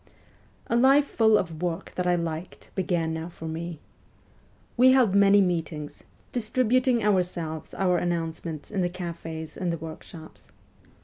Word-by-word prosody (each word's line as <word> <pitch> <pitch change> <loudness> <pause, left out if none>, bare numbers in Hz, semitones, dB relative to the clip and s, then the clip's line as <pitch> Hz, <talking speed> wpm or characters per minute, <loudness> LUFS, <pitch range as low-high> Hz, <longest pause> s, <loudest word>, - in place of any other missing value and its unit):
A - - -1
life 270 +4 +5
full 220 -5 +4
of 165 -4 -3
work 175 -2 -3
that 180 0 -2
I 180 - +4
liked 170 0 -5
began 170 -4 -1
now 160 +1 -4
for 160 -1 -9
me. 165 +1 -5 1.0
"We 255 +1 +6
held 250 -7 +4
many 200 0 +6
meetings, 160 -5 -2 0.3
distributing 250 +1 +1
ourselves 175 -6 -1
our 180 -2 +2
announcements 165 -2 -3
in 200 -3 -1
the 175 - +1
cafes 165 -3 -6
and 180 -2 -2
the 170 - -2
workshops. 160 0 -10
175 Hz, 140 wpm, -26 LUFS, 165-205 Hz, 1.0 s, We